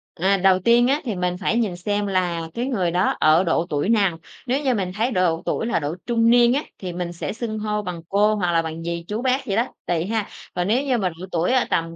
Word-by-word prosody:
À, 195 +3 +2
đầu 190 0 +4
tiên 235 +5 +4
á 285 +3 +1
thì 230 -7 -3
mình 180 0 -1
phải 200 +4 0
nhìn 215 -7 0
xem 205 +3 -2
là 175 -4 -1
cái 240 - -2
người 195 -10 0
đó 180 +3 +1
ở 155 +4 +5
độ 170 -1 +1
tuổi 145 +5 -1
nào. 200 -7 +2 0.3
Nếu 265 +4 0
như 260 -2 +2
mình 190 -5 -2
thấy 230 +5 0
độ 175 -4 +1
tuổi - - -1
là 235 - 0
độ 150 +1 -3
trung 230 -1 +2
niên 240 0 +5
á, 285 +3 0
thì 180 -3 -6
mình 175 -1 -4
sẽ 170 - -4
xưng 220 -1 -4
hô 210 0 -1
bằng 180 -4 -6
cô 210 +2 +3
hoặc 180 -4 0
là 165 -1 +3
bằng 160 0 -6
dì, 170 0 -3
chú, 215 +3 -3
bác 260 +1 0
gì 195 - -1
đó, 235 +3 +1 0.2
tuỳ 170 -1 0
ha. 220 0 -2 0.2
Còn 180 +1 -1
nếu 245 +6 +2
như 260 -3 +1
mà 190 -5 0
độ 170 +2 -9
tuổi 170 +6 +1
ở 255 - +3
tầm 165 0 -1
195 Hz, 265 wpm, -22 LUFS, 175-230 Hz, 0.3 s, ở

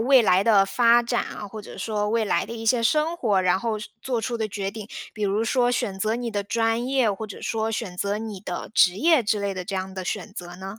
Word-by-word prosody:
未 260 +2 +6
来 190 -3 +4
的 205 -3 +5
发 235 +4 +5
展 240 0 0
啊， 210 - -7
或 210 +1 -8
者 - - -11
说 210 -2 -1
未 230 0 +1
来 205 - +1
的 - - -8
一 225 -1 -6
些 235 +1 +3
生 305 +7 +2
活， 210 - +2
然 185 +1 +2
后 225 -1 -1
是 210 - -8
做 245 -3 -1
出 235 +2 -2
的 220 -2 -2
决 195 -1 -3
定， 215 -1 -8 0.2
比 215 - -7
如 205 +2 +1
说 245 +1 +2
选 210 -5 -1
择 215 +4 0
你 240 -1 -3
的 205 -2 -2
专 225 +3 0
业， 260 -5 +2
或 210 +3 -6
者 205 -3 -9
说 225 0 -1
选 185 -4 -4
择 200 +3 -1
你 215 -4 -6
的 180 -3 -5
职 180 -2 +5
业 315 +2 +4
之 210 0 +1
类 200 -1 -2
的 180 -1 -5
这 195 0 -4
样 190 0 -4
的 185 -1 -5
选 200 +2 -4
择 175 -3 -8
呢？ 195 +3 -8
215 Hz, 285 characters per minute, -24 LUFS, 195-235 Hz, 0.2 s, 未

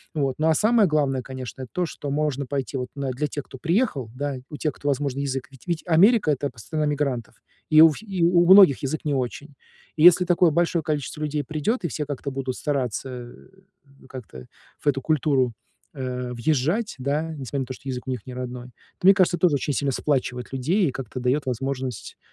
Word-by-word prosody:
Вот, 135 -4 0
ну 155 - +2
а 160 - +4
самое 220 0 +4
главное, 140 -4 +1
конечно, 130 -1 -8
это 125 - -7
то, 180 -1 0
что 145 -2 -6
можно 145 -1 -1
пойти 135 -2 -3
вот 125 -1 -3
на 135 -2 -2
для 150 +4 -2
тех, 145 -1 -5
кто 130 - -12
приехал, 165 - 0
да, 140 0 -3
у 150 - -7
тех, 155 - -1
кто, 145 - -7
возможно, 140 -1 -1
язык 135 -2 -3
ведь 135 +5 -18
ведь 170 -3 -2
Америка- 180 +1 +4
это 140 0 -1
пс 115 - -14
страна 155 -2 -2
мигрантов. 140 -6 -2 0.3
И 155 0 +7
у 160 -1 +9
фи 220 - -11
и 190 -4 -2
у 175 0 +5
у - - +3
многих 190 -10 +7
язык 150 +4 -2
не 145 - 0
очень. 135 +2 -3 0.4
И 155 - 0
если 180 +1 +8
такое 175 -1 +4
большое 170 +1 +1
количество 150 0 -3
людей 150 -1 -1
придет, 155 - -2
и - - +1
все 150 0 -4
как-то 140 -1 -5
будут 130 -1 -3
стараться, 135 -3 -2
э, 120 - -10 0.5
ну - - -18
как-то 110 - -10 0.4
в - - -8
эту 135 -1 +2
культуру, 135 -4 +1 0.4
э, 125 -2 -4
въезжать, 155 - 0
да, 140 +4 0
несмотря 140 -3 -5
на - - -2
то, 130 - -6
что 135 - -9
язык 125 0 -5
у - - -1
них 125 -5 -5
не 130 - -8
родной, 125 -1 -6
то, 150 +8 -5
мне 195 - +10
кажется, 185 -2 +2
тоже 170 -6 +3
очень 140 +1 -1
сильно 140 +1 0
сплачивает 125 -3 -2
людей, 160 +8 +1
и - - -1
как-то 130 -1 -6
дает 130 +4 0
возможность 130 -1 -4
140 Hz, 220 wpm, -24 LUFS, 130-155 Hz, 0.5 s, мне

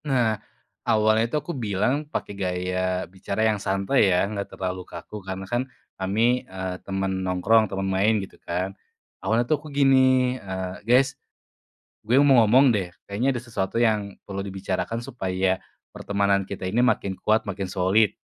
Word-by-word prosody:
Nah, 125 -6 +2 0.6
awalnya 110 +1 +3
itu - - -3
aku 150 +4 -4
bilang 125 +5 -1
pakai 100 - -4
gaya 90 -1 -1
bicara 100 +4 -3
yang 105 -2 +1
santai 100 +3 +2
ya 90 +1 +3
enggak 100 0 -4
terlalu 95 -1 -3
kaku, 105 - -8
karena 95 0 -6
kan 120 +6 -2 0.3
kami, 115 +6 +2
eee, 95 -1 -4
temen 95 -1 -2
nongkrong 95 +4 +3
temen 95 0 -3
main 95 +3 +2
gitu 95 -2 -7
kan. 90 +3 -3 0.5
Awalnya 110 +5 +1
tuh 145 +3 0
aku 155 - -10
gini, 130 -2 +3
eee, 95 -1 -5
"Guys 135 +2 +5 0.9
gue 120 - +3
mau 135 -3 +6
ngomong 130 +4 +6
deh 100 -5 0 0.2
kayaknya 120 +7 -1
ada 120 - -3
sesuatu 105 -6 -3
yang 110 -4 +1
perlu 100 -1 -6
dibicarakan 100 +4 -3
supaya 95 -7 -1 0.3
pertemanan 100 -1 0
kita 100 -2 -6
ini 95 +6 0
makin 100 -6 +1
kuat, 110 +1 +2
makin 100 -1 -4
solid." 95 +3 +2
100 Hz, 155 wpm, -25 LUFS, 95-120 Hz, 0.9 s, mau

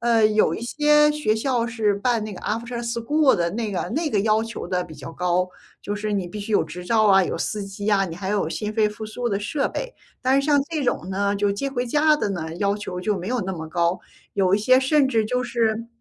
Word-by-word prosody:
呃， 230 -2 +4
有 215 0 +2
一 - - -6
些 300 +4 +3
学 295 -8 0
校 240 0 0
是 225 -3 0
办 225 +2 0
那 215 -2 -6
个 - - -10
After 235 +2 -3
school 240 +5 +2
的 170 -1 0
那 220 +1 -3
个 185 - -2
那 315 +1 -1
个 210 - +1
要 215 +1 +2
求 225 0 -6
得 180 -1 -1
比 155 - -12
较 165 - -9
高。 180 +1 0 0.3
就 205 - -4
是 210 0 -3
你 195 -3 -1
必 210 - -7
须 205 +2 -7
有 - - +4
执 175 +3 -8
照 220 +3 +3
啊， 195 -2 +6
有 - - -3
司 210 -1 -2
机 195 +1 -5
啊， 195 -2 +3
你 170 -3 -6
还 190 +1 -5
有 205 0 0
心 210 -1 -3
肺 215 -1 +3
复 210 +1 -7
苏 240 +3 -3
的 200 -3 0
设 275 +7 -1
备。 - - -5 0.3
但 260 +2 +3
是 - - -4
像 290 -1 +4
这 315 -3 -1
种 185 -7 -1
呢 200 +1 0
就 200 0 +1
接 275 +8 -3
回 250 -2 -2
家 300 +4 +3
的 210 - -1
呢， 160 -4 -4
要 200 +2 0
求 190 -3 -5
就 210 +2 0
没 180 +2 -5
有 250 0 0
那 190 +1 -3
么 160 -3 -6
高。 170 +2 0 0.3
有 190 -2 +3
一 - - +2
些 255 +5 +5
甚 275 +1 +3
至 225 -4 +1
就 250 +3 -1
是 230 -2 0
215 Hz, 305 characters per minute, -23 LUFS, 195-245 Hz, 0.3 s, 啊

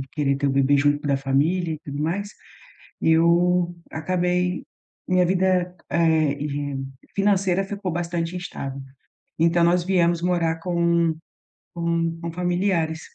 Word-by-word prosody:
querer 140 -2 0
ter 140 +1 -1
o - - +2
bebê 135 +1 +3
junto 145 +1 +2
da 140 -1 +2
família 155 +6 0
e 155 - -8
tudo 145 +1 -4
mais. 200 +6 -2 0.7
Eu 175 +2 +3 0.2
acabei 180 +2 -1 0.4
minha 185 0 +3
vida, 180 0 +1 0.2
eh, 160 -2 +2
de 145 -1 -3 0.4
financeira 195 -2 +2
ficou 195 -1 -4
bastante 170 0 -3
instável. 140 -6 -6 0.6
Então, 170 +1 +3
nós 175 +1 +3
viemos 175 -2 +2
morar 170 -2 +1
com 170 -2 +1 0.6
com 170 -1 -1
com 170 -1 -4
familiares. 175 -2 0
170 Hz, 130 wpm, -23 LUFS, 155-180 Hz, 0.7 s, bebê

